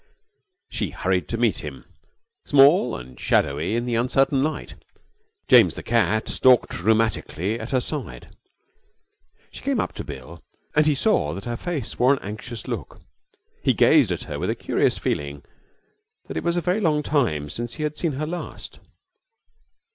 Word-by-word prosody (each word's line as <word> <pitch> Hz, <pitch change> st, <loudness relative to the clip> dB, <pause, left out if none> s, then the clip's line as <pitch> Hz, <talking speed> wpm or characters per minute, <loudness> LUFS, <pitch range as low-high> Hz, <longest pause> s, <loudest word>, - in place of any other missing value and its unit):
She -, -, -1 dB
hurried 90 Hz, 0 st, -1 dB
to 115 Hz, -, -3 dB
meet 115 Hz, -5 st, +1 dB
him, 65 Hz, -5 st, -8 dB, 0.6 s
small 140 Hz, -, +5 dB
and 65 Hz, -1 st, -10 dB
shadowy 75 Hz, +9 st, +1 dB
in 120 Hz, +1 st, -1 dB
the 120 Hz, -, -2 dB
uncertain 130 Hz, +3 st, +2 dB
light. 155 Hz, +2 st, -3 dB, 0.7 s
James, 125 Hz, -4 st, +6 dB
the -, -, -7 dB
cat, 110 Hz, -2 st, +1 dB
stalked 130 Hz, -2 st, +4 dB
rheumatically 110 Hz, 0 st, 0 dB
at 110 Hz, -, -6 dB
her 130 Hz, -, +2 dB
side. 145 Hz, +3 st, -6 dB, 1.2 s
She -, -, -10 dB
came 275 Hz, -4 st, 0 dB
up -, -, -2 dB
to -, -, -6 dB
Bill, 75 Hz, +6 st, -9 dB, 0.3 s
and 155 Hz, 0 st, +4 dB
he 150 Hz, -, +3 dB
saw 135 Hz, -, +1 dB
that 95 Hz, -, -8 dB
her 120 Hz, 0 st, -3 dB
face 150 Hz, -3 st, -4 dB
wore 130 Hz, +3 st, +5 dB
an 140 Hz, -, -2 dB
anxious 110 Hz, +3 st, -7 dB
look. -, -, -5 dB, 0.6 s
He -, -, +3 dB
gazed -, -, +5 dB
at -, -, -3 dB
her -, -, -6 dB
with -, -, -2 dB
a -, -, 0 dB
curious -, -, 0 dB
feeling 70 Hz, 0 st, -3 dB, 0.8 s
that 80 Hz, -, -8 dB
it 80 Hz, -, -2 dB
was 170 Hz, +1 st, 0 dB
a -, -, +1 dB
very 180 Hz, +4 st, 0 dB
long 155 Hz, -6 st, +1 dB
time 115 Hz, -, 0 dB
since 120 Hz, 0 st, -5 dB
he 155 Hz, -, -4 dB
had 150 Hz, 0 st, -2 dB
seen 165 Hz, -2 st, -1 dB
her 145 Hz, +3 st, -3 dB
last. 175 Hz, +3 st, -7 dB
120 Hz, 170 wpm, -23 LUFS, 95-150 Hz, 1.2 s, James